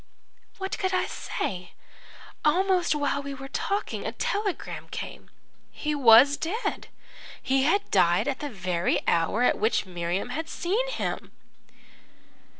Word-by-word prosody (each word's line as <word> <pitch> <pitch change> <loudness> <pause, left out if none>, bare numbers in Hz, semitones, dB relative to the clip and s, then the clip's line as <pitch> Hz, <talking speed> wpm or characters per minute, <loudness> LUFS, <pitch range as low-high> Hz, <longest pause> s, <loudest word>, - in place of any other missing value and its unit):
"What 385 0 -4
could 375 0 0
I - - +1
say? 180 -2 -4 0.7
Almost 360 +1 +3
while 285 -1 0
we 280 0 -6
were 270 0 -8
talking 400 +8 -2
a - - -2
telegram 405 -2 -3
came. - - -7 0.4
He 300 0 -3
was 270 +1 +7
dead 420 +9 -3 0.5
he 270 0 +1
had 400 +7 +1
died 175 +2 +3
at 275 -2 -1
the 295 - -4
very 180 -5 -1
hour 170 +8 +2
at - - +3
which 220 0 +1
Miriam 175 +3 -3
had 320 +6 -4
seen 440 +8 -1
him." - - -3
280 Hz, 135 wpm, -26 LUFS, -, 0.7 s, was